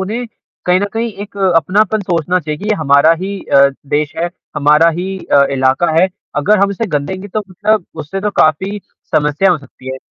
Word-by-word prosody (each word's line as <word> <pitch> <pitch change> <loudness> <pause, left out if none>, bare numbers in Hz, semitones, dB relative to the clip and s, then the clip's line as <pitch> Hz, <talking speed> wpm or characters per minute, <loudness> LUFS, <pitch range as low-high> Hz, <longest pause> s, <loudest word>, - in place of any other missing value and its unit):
उन्हें 220 +6 -3 0.4
कहीं 180 +1 +3
न - - +1
कहीं 230 0 -2
एक 205 - -11 0.2
अपनापन 210 +5 +2
सोचना 180 -2 0
चाहिए 150 -1 -5
कि 205 - -9
ये 215 - +3
हमारा 145 +2 +5
ही 195 +1 -4
अ, 140 0 +6 0.3
देश 150 +1 0
है, 170 +1 -1 0.3
हमारा 150 +3 +4
ही 190 +2 -4
अ, 140 - +6
इलाका 135 +5 +1
है, 185 - +4 0.3
अगर 205 +9 +3
हम 200 - +3
इसे 215 +3 -3
गंदेंगे 185 +7 -5
तो 215 +3 -2
मतलब 210 +1 0 0.2
उससे 190 +6 -5
तो 210 - -1
काफ़ी 190 +7 +1 0.4
समस्या 150 +6 +2
हो 175 - +1
सकती 130 -2 -13
है। - - -5
180 Hz, 195 wpm, -15 LUFS, 150-200 Hz, 0.4 s, अ